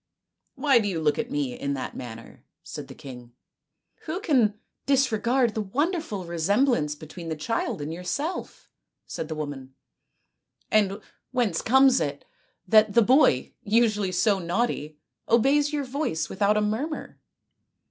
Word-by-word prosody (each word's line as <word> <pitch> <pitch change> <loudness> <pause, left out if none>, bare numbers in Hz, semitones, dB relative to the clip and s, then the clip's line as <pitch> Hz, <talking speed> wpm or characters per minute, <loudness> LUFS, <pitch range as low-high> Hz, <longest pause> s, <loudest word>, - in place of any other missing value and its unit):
" - - -59
Why 275 -5 +4
do 210 - -1
you 180 -5 -2
look 150 -2 +1
at 230 - -2
me 280 -2 -2
in 140 -12 -3
that 130 - -5
manner? 115 -2 -9
" - - -60
said - - -8
the - - -11
king. 125 -3 -11 0.3
" - - -33
Who 330 +4 -3
can 240 - +2 0.3
disregard 250 -3 +2
the 220 - -2
o - - -5
o - - -15
wonderful 295 - -1
resemblance 170 - +1
between 165 +2 -9
the 160 - -2
child 155 -2 -2
and 155 +2 -4
your 175 +2 -7
self? 300 - -4 0.2
" - - -58
said 160 - -5
the 155 - -5
woman, 140 -3 -6 0.5
" - - -47
and 205 -1 +2 0.3
whence 240 -10 0
comes 265 +1 +5
it 145 -1 -3 0.4
that 215 +1 +5
the 235 - +7
boy, 260 +7 +3
usually 215 -3 +2
so 195 +2 +2
naughty, 170 -4 -2 0.3
obeys 280 +6 +3
your 295 -1 -1
voice 260 - -2
without 205 +2 +2
a - - +2
murmur 235 +10 -3
210 Hz, 170 wpm, -26 LUFS, 160-260 Hz, 0.5 s, the